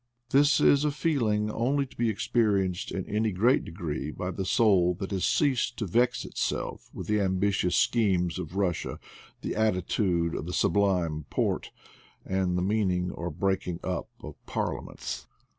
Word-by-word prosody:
This 140 0 +5
is 140 0 +5
a 150 - +2
feeling 115 -9 0
only 135 +6 +1
to 130 - -17
be 120 -1 +1
experienced 105 -5 0
in 95 - -3
any 110 +1 0
great 115 +8 +3
degree 80 -4 -4
by 90 +4 -4
the 95 +1 -4
soul 90 -4 +3
that 95 +2 -6
has 95 -2 0
ceased 130 -5 +1
to 110 - -2
vex 120 +7 +1
itself - - -3
with - - -7
the 105 -1 +1
ambitious 95 -1 +1
schemes 95 -7 +2
of 80 - -5
Bussia, 95 -1 -1 0.5
the - - -2
attitude 90 -4 +1
of 80 - -4
the 90 - -4
Sublime 90 -8 +1
Porte, - - -1 0.6
and 95 -1 0
the 90 - 0
meeting 95 -3 +1
or 85 - -4
breaking 90 +1 -1
up 90 -2 -3
of - - -10
parliaments. - - -4
95 Hz, 160 wpm, -28 LUFS, 90-110 Hz, 0.6 s, This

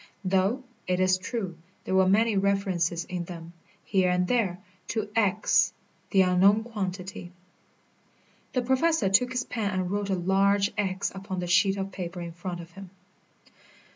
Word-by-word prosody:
Though, 195 +7 +1 0.2
it 180 0 +1
is 185 0 +3
true, 185 -4 -4 0.2
there - - -3
were 190 0 +4
many 220 +2 +3
references 190 -4 0
in 180 -2 -4
them, 170 -1 -9 0.3
here 190 -2 +2
and 180 0 +1
there, 210 -7 +1 0.3
to 215 -2 -3
X, 210 -2 +3 0.4
the 195 -2 +5
unknown 190 +4 +4
quantity. 190 -5 -5 1.2
The 250 - +1
Professor 260 -2 +2
took 245 +6 +3
his 250 -1 -1
pen 220 -4 -2
and 185 -2 -2
wrote 205 0 -2
a 190 - +2
large 195 +2 +2
X 190 -1 -1
upon 190 -1 -5
the 180 - -2
sheet 195 +3 +3
of 195 0 -3
paper 180 -1 -6
in 170 -1 -5
front 175 +1 -6
of 170 0 -13
him. 195 +1 -11
190 Hz, 160 wpm, -27 LUFS, 180-205 Hz, 1.2 s, the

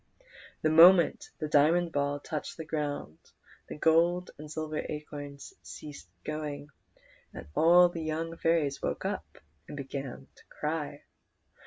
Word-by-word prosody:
The 155 - +3
moment 170 +2 +6
the 155 - -3
diamond 165 +4 +3
ball 145 0 -1
touched 150 +1 -5
the 160 - -6
ground 145 - -4 0.5
the - - -7
gold 170 +3 +3
and 150 0 -9
silver 155 0 -3
acorns 145 -2 -7
ceased 145 -11 -10
going, 150 -1 -5 0.7
and - - -8
all 175 - +6
the 175 -1 -6
young 160 +1 -3
fairies 165 -4 +1
woke - - -3
and 75 - -7
began 135 -1 -6
to - - -21
cry. 150 -1 -4
150 Hz, 130 wpm, -29 LUFS, 145-165 Hz, 0.7 s, moment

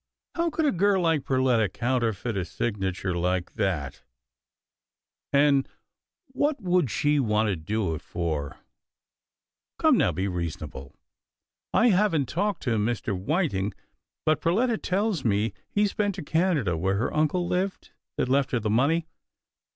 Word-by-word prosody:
How 335 0 0
could 320 0 -1
a 290 - +3
girl 190 0 +2
like 160 -4 +2
Perletta 130 -5 +2
counterfeit 120 -2 -1
a 95 - -1
signature 95 -2 -2
like 90 +1 -1
that? 80 -9 -2 0.7
— - - -65
and 140 -1 +3 0.6
what 285 +2 0
would 180 - +1
she 145 +7 +1
want 110 -3 +2
to 100 - 0
do 95 +2 -2
it 80 - -5
for? 80 -5 -3 0.6
— - - -65
Come - - +4
now, - - +3
be 95 +2 -2
reasonable. 80 -6 -5 0.8
I 240 - +4
haven't 180 - +2
talked 200 - -1
to 115 -5 +1
Mr. 110 -1 -1
Whiting, 100 - -1 0.5
but 155 -1 +2
Perletta 220 +8 +1
tells 195 -4 0
me 105 -1 +1 0.2
he's 205 -1 +1
been 205 -1 0
to 185 - -6
Canada 155 - +1
where 95 +4 0
her 115 +6 -1
uncle 155 +4 +1
lived 185 +2 -2 0.3
that - - +1
left 135 +1 +2
her 125 - +2
the 105 -1 -1
money. 150 +9 +2
130 Hz, 150 wpm, -26 LUFS, -, 0.8 s, Come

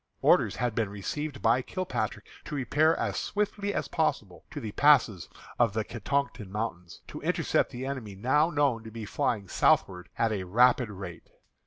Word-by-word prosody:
Orders - - +4
had 125 -2 -1
been 110 -3 0
received 145 +10 -5
by 115 +3 +4
Kilpatrick 110 - -3 0.2
to - - -5
repair 150 +5 +2
as - - -2
swiftly 205 0 -1
as - - -2
possible 105 - -1
to - - -6
the 110 - -5
passes 125 - +4 0.3
in 120 -1 +5
the 110 0 0
Catoctin 115 -1 -3
Mountains, 95 -5 -5
to - - -8
intercept - - +1
the 125 +2 -6
enemy 125 -7 -5
now 130 - +2
known 140 -8 +1
to 110 - -8
be 110 -1 -7
flying 105 -1 -1
southward 90 0 +2
at 115 -1 +2
a 100 -3 -2
rapid 120 +4 +4
rate. 95 -4 -9
115 Hz, 170 wpm, -28 LUFS, 105-140 Hz, 0.3 s, in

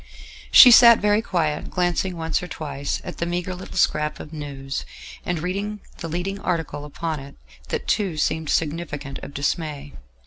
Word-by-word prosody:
She 250 - +10
sat 235 -1 +9
very 210 +1 +2
quiet, 165 -8 -1
glancing 180 0 -1
once 160 -1 -1
or 180 - -6
twice 145 -4 -4
at - - -7
the 170 - -1
meagre 180 +1 -2
little 185 +1 -9
scrap 150 -3 +1
of 155 - -10
news, 140 -2 -5 0.4
and 175 - -2
read 200 +6 -3 0.2
the 165 - -5
leading 180 +4 -3
article 165 -5 -3
upon 155 +1 -4
it: 140 +1 -11 0.3
that - - -4
too 190 -7 0
seemed 160 0 -1
significant 150 -3 -2
of 140 - -10
dismay. 145 - -3
165 Hz, 165 wpm, -23 LUFS, 150-180 Hz, 0.4 s, She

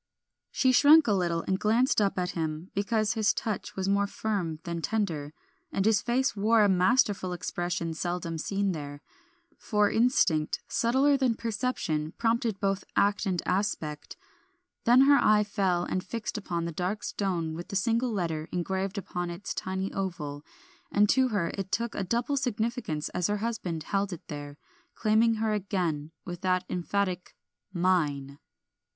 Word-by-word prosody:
She 260 - +2
shrunk 290 +4 +7
a 215 - +2
little 170 -3 0
and 190 0 -1
glanced 225 +2 +3
up 200 -2 +1
at 180 -1 -1
him, 160 +1 -4
because 215 +1 +1
his 220 -1 +2
touch 215 -4 -3
was 190 0 -2
more 200 0 +2
firm 195 -7 -2
than 170 -1 -4
tender, 165 -9 -2 0.4
and 195 - 0
his 220 -2 +4
face 250 +2 0
wore 215 +2 +4
a - - +5
masterful 190 -1 +2
expression 175 -1 -3
seldom 170 0 -3
seen 200 +3 0
there; 145 -3 -7 0.6
for 210 -2 +2
instinct, 200 -10 +2
subtler 265 +4 +3
than 255 -4 +1
perception, 210 -10 -2
prompted 230 -3 0
both 195 -1 0
act 205 +1 +2
and 180 -3 -1
aspect. 180 -6 -2 0.7
Then 245 +3 +7
her 280 +1 +6
eye 210 0 +5
fell 190 -4 0
and 185 +1 -2
fixed 230 +1 -5
upon 175 -5 -3
the 170 - -3
dark 180 +6 -3
stone 175 -5 -2
with 170 +2 -7
the - - -6
single 230 +4 +1
letter 165 -6 -2
engraved 190 +3 -2
upon 175 -2 -3
its 175 +4 -5
tiny 190 +1 -3
oval, 160 -7 -4 0.5
and 210 -4 +4
to 260 +2 +4
her 200 -8 -1
it 195 -1 -5
took 235 +3 -1
a 200 - -2
double 240 +8 0
significance 220 - -2
as 180 -1 -1
her 210 0 0
husband 205 -7 -3
held 195 +3 -1
it 175 0 -8
there, 145 -1 -7 0.4
claiming 225 +1 +3
her 220 0 0
again, 180 -7 -2 0.2
with 175 -1 -6
that 185 -1 +1
emphatic 180 0 -2 0.4
"Mine." 150 -7 0
195 Hz, 160 wpm, -28 LUFS, 170-220 Hz, 0.7 s, shrunk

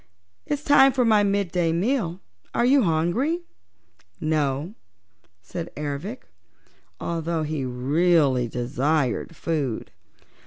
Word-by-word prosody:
It's 290 0 -2
time 275 -2 +6
for 255 -2 +2
my 215 -2 +5
midday 185 -4 +1
meal; 185 -1 -1 0.3
are 235 - +3
you 270 +2 +5
hungry?" 195 - +1 0.8
"No," 155 +2 -1 0.7
said 170 - -6
Ervic, 150 - -4 0.8
although 165 -1 -2
he 150 -3 -2
really 135 0 +2
desired 130 +5 -1
food. 150 -8 -2
165 Hz, 95 wpm, -24 LUFS, 145-205 Hz, 0.8 s, time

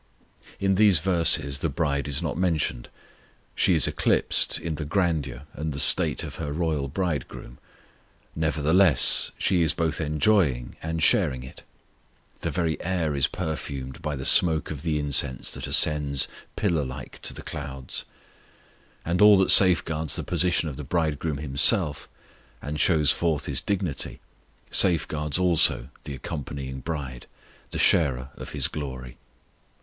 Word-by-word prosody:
In 95 0 +1
these 100 -5 +6
verses 80 -5 +2
the 80 - -2
bride 70 -1 -2
is 70 +3 0
not 80 - -3
mentioned; 80 -9 -2 0.6
she - - +2
is - - +5
eclipsed - - +1
in 85 -1 -5
the 75 - -5
grandeur 75 -6 -2
and 80 0 -5
the 70 - -4
state - - +5
of - - -8
her 70 - -5
royal 75 -3 -2
Bridegroom; 75 -6 -5 0.8
nevertheless, 80 0 +3
she 90 -2 +1
is 80 - +1
both 80 0 -2
enjoying 75 - 0
and 80 0 -3
sharing 70 -11 +2
it. 65 - -11 0.8
The - - -3
very 85 -3 -2
air 85 -4 -2
is 70 - +2
perfumed 70 -2 -6
by 75 -3 -4
the 65 -1 -7
smoke 80 -4 +3
of 70 -3 -6
the 80 -2 -2
incense 70 -2 -1
that - - -6
ascends 70 -3 +3 0.3
pillar 85 -8 -1
like 65 0 -9
to - - -2
the - - -10
clouds; 65 -2 -6 1.0
and 85 +3 -1
all 105 -1 +7
that 95 - +3
safeguards 80 -5 +6
the - - -4
position 90 -2 0
of 70 -4 -7
the 75 - -7
Bridegroom 80 0 -2
Himself, 75 - 0 0.5
and 75 +3 -6
shows 75 -5 +3
forth 80 +1 -2
His - - -1
dignity, 95 -7 -3 0.5
safeguards 75 -4 +2
also 80 -8 +2 0.2
the 70 - -6
accompanying 65 -1 -7
bride, 65 -4 -7 0.4
the - - -6
sharer 65 -4 +1
of - - -10
His - - 0
glory. 65 -4 -8
75 Hz, 145 wpm, -24 LUFS, 70-85 Hz, 1.0 s, all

